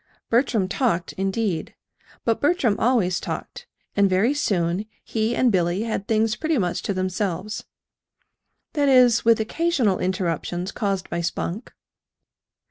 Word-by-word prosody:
Bertram 230 -5 +2
talked, 190 -4 0
indeed 195 -3 -2 0.5
but 230 -1 +1
Bertram 285 - +2
always 215 -8 +2
talked; - - -6 0.3
and 200 -1 +4
very 195 +9 +3
soon 195 -8 0 0.2
he 225 +1 -1
and 250 -2 +3
Billy 180 +1 +1
had 215 -3 -3
things 220 0 +2
pretty 315 +3 0
much 180 -6 -1
to 200 - -2
themselves 185 +2 -2 1.1
that 285 -3 +2
is, 250 -3 +5
with 230 -1 +4
occasional 245 - +1
interruptions 180 0 -2
caused 195 -3 -2
by 170 - -1
Spunk. 175 +5 -3
210 Hz, 130 wpm, -23 LUFS, 185-235 Hz, 1.1 s, is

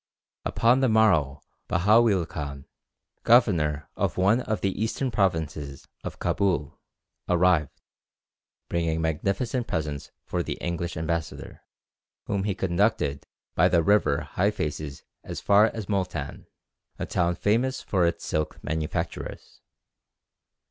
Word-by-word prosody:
Upon 120 +3 +3
the 130 -2 +3
morrow 85 -11 +3 0.3
Bahaweel 105 0 +4
Khan, 70 -2 -6 0.6
governor 80 - +3
of - - -1
one 100 +7 +3
of 110 -3 -2
the 100 - +1
eastern 125 +3 -1
provinces 80 -8 -1 0.2
of - - -6
Cabul, 85 -6 0 0.5
arrived, 90 -4 +2 0.9
bringing 85 -1 0
magnificent 100 - -1
presents 75 -4 -3 0.2
for - - -1
the - - -3
English 85 -1 -4
ambassador, 80 0 -4 0.6
whom 100 -1 -1
he 100 -3 -1
conducted 95 -5 0 0.3
by - - +4
the 85 - +3
river 80 -7 +2
Hyphases 75 -7 -2 0.2
as - - -6
far 105 +2 +5
as 110 -2 -5
Moultan, 95 -3 -3 0.5
a - - -3
town 85 0 0
famous 120 +8 0
for 90 -4 +2
its 85 - -3
silk 75 0 -2
manufactures. 80 0 -4
90 Hz, 115 wpm, -26 LUFS, 80-105 Hz, 0.9 s, far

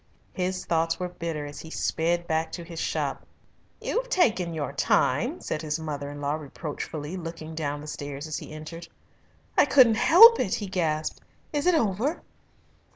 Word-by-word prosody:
His 185 0 -2
thoughts 165 +1 +1
were 180 -1 -2
bitter 165 -4 -4
as 145 0 -8
he 160 - -9
sped 170 +2 0
back 160 0 -1
to 170 - -5
his 165 -1 -8
shop. - - -2 0.6
"You've - - -2
taken 220 - +2
your 150 -4 -3
time," - - +1
said 155 - -3
his 155 0 -2
mother 145 -3 -4
in 145 0 -8
law 145 0 -1
reproachfully, 150 +1 -5
looking 165 -2 -7
down 145 -2 -3
the 150 - -9
stairs 145 -1 -6
as 155 -1 -4
he - - -10
entered. 155 +2 -8 0.7
"I - - +6
couldn't 255 -5 +6
help 455 - +9
it!" 205 -7 +1
he 210 - -4
gasped. 160 -5 -1 0.3
"Is 295 +3 0
it 360 - +5
over?" 230 - 0
165 Hz, 170 wpm, -26 LUFS, 155-190 Hz, 0.7 s, help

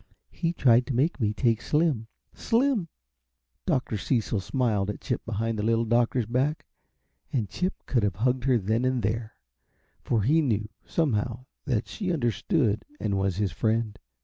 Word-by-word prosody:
He 165 -1 -1
tried 125 -7 +4
to 135 - -2
make 145 +6 +1
me 105 -2 +2
take 115 +1 +1
Slim. 150 -8 +1 0.3
Slim!" 235 -6 +1 0.8
Dr. 125 -4 0
Cecil 110 -2 0
smiled 105 -2 0
at 105 - -4
Chip 125 -4 -3
behind 115 0 -1
the - - -1
Little 115 +1 +2
Doctor's 120 +1 +2
back, 130 +7 0 0.7
and 115 -7 0
Chip 185 - -2
could 120 - +1
have 100 -3 0
hugged 125 +4 0
her 130 -3 +4
then 110 +3 0
and 130 -2 +1
there, 110 +2 -2 0.7
for 115 -4 0
he 155 +8 +4
knew, 110 -7 0 0.2
somehow, 125 -5 -1 0.2
that 125 -7 0
she 195 -5 -3
understood 120 - +1 0.2
and 100 -2 -1
was 95 -2 0
his 100 0 0
friend. 110 -1 0
120 Hz, 160 wpm, -27 LUFS, 110-135 Hz, 0.8 s, tried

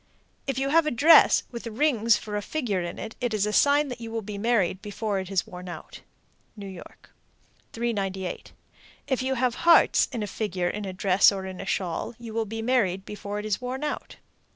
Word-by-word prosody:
If 270 -2 -1
you 270 +1 0
have 320 +1 +4
a - - +4
dress 305 +6 +6
with 235 -1 -7
rings 230 -2 +2
for 210 -1 -6
a 205 - -1
figure 215 -7 -2
in 175 0 -5
it, 220 - -7
it 240 -3 0
is 210 -1 +1
a 210 - -2
sign 285 0 +3
you 230 -1 -7
will 225 -1 -4
be 205 0 -6
married 200 -5 +1
before 205 -1 -3
it 190 -1 -6
is 195 -3 0
worn 180 0 -9
out. 175 - -9 0.6
New 200 - -8
York. 190 -3 -12 0.6
398. 195 -6 -3 0.5
If 265 -2 -1
you 265 +1 -1
have 250 -1 +1
hearts 340 0 +5
in 235 -5 -3
a - - -1
figure 190 -4 -2
in 210 +2 -4
a 190 - -4
dress 190 +1 +4
or 195 -1 -5
in 185 -1 -7
a 195 - -8
shawl, 185 +6 -2
you 230 -2 -9
will 225 0 0
be 225 +1 -5
married 200 -7 +1
before 205 0 -6
it 210 - -4
is 215 +2 -1
worn 255 +3 -4
out. 300 - -4
215 Hz, 210 wpm, -26 LUFS, 195-245 Hz, 0.6 s, dress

